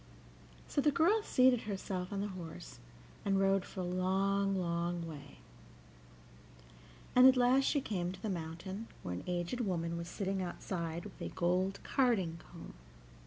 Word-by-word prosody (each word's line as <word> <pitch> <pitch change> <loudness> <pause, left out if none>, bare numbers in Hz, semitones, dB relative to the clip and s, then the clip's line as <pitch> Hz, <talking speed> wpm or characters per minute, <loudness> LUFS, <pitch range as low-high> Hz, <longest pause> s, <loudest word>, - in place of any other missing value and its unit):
So 285 - +1
the 295 - +4
girl 345 +9 +3
seated 255 - +4
herself 190 -2 -3
on 200 -1 -2
the 205 - -2
horse, 165 - -8 0.4
and 195 -1 +2
rode 195 -1 +3
for 185 - -6
a - - -2
long, 195 +2 +1
long 170 -1 -1
way, 145 -3 -10 1.8
and 250 +1 +9
at 260 0 +6
last 255 +2 +4
she 285 - +2
came 180 -7 -2
to 190 - -9
the - - -1
mountain, 185 +4 -5 0.2
where 90 - -3
an 90 - -5
aged 175 +6 -2
woman 170 -6 -1
was 170 0 -5
sitting 190 +1 -2
outside 170 -2 -4
with - - -11
a - - -3
gold 185 +2 0
carding 215 - +1
comb. 170 0 -11
190 Hz, 160 wpm, -34 LUFS, 170-210 Hz, 1.8 s, and